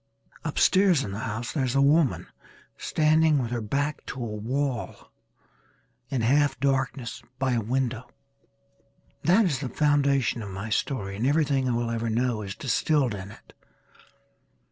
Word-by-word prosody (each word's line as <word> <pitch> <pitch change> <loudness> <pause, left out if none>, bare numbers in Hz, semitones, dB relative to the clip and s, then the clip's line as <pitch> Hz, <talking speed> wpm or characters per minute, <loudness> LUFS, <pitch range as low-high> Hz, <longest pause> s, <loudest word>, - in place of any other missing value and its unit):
Upstairs 185 -7 +3
in 100 - -5
the 100 - -5
house 115 +2 -4
there 145 - -1
is 125 0 -1
a - - +4
woman 145 0 +3 0.5
standing 155 0 +2
with 120 -4 -2
her 120 -1 -2
back 140 +7 -2
to - - -5
a 120 - -3
wall, 125 +4 -3 1.0
in 130 -4 -1
half 140 +2 +2
darkness 130 -4 -1 0.2
by 130 -1 0
a 120 -2 +1
window. 125 +1 -2 1.1
That 195 +6 +4
is 145 -8 0
the 135 -2 -4
foundation 140 -5 +2
of 105 - -6
my 100 +3 -6
story 105 -5 -1
and 120 +5 0
everything 140 -3 +2
I - - +1
will 120 0 -1
ever 115 0 -2
know 115 0 0
is 100 -2 -6
distilled 135 -1 +1
in 100 0 -7
it. - - -16
130 Hz, 155 wpm, -26 LUFS, 115-145 Hz, 1.1 s, a